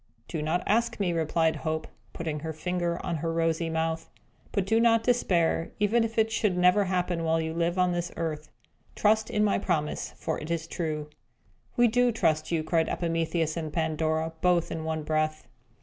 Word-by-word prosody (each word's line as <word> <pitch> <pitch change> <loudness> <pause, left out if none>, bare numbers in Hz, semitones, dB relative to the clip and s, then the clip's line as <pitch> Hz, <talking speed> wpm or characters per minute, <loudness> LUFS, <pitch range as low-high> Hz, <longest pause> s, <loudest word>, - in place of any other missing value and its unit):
"Do 160 - -3
not 160 +4 0
ask 230 +2 +1
me," 180 -4 +1
replied 160 0 +1
Hope, 155 +2 -2 0.3
putting 160 -2 -4
her 160 +1 -4
finger 175 +1 -2
on 170 - -1
her 165 +2 -2
rosy 165 0 0
mouth. 160 0 -2 0.4
"But 200 - 0
do 225 +3 +3
not 230 -1 +4
despair, 175 -9 +2
even 215 +3 +3
if 225 0 -4
it 220 0 +3
should 210 -4 +1
never 180 +3 +4
happen 180 -2 -1
while 165 0 +2
you 160 0 -2
live 170 +2 0
on 180 -1 +3
this 175 0 -2
earth. 155 -2 -3 0.5
Trust 215 +1 +2
in 210 - +1
my 205 - +2
promise, 160 -6 -1
for - - -2
it 155 - -7
is 165 -1 -1
true." 155 -3 -4 0.7
"We 240 0 +6
do 245 +2 +3
trust 160 -8 +1
you!" 165 -2 +1
cried 160 0 +1
Epimetheus 165 -1 -1
and 160 -2 -4
Pandora, 160 0 0
both 180 -2 +2
in 160 -1 -3
one 160 -1 -2
breath. 155 0 -1
165 Hz, 185 wpm, -28 LUFS, 160-185 Hz, 0.7 s, We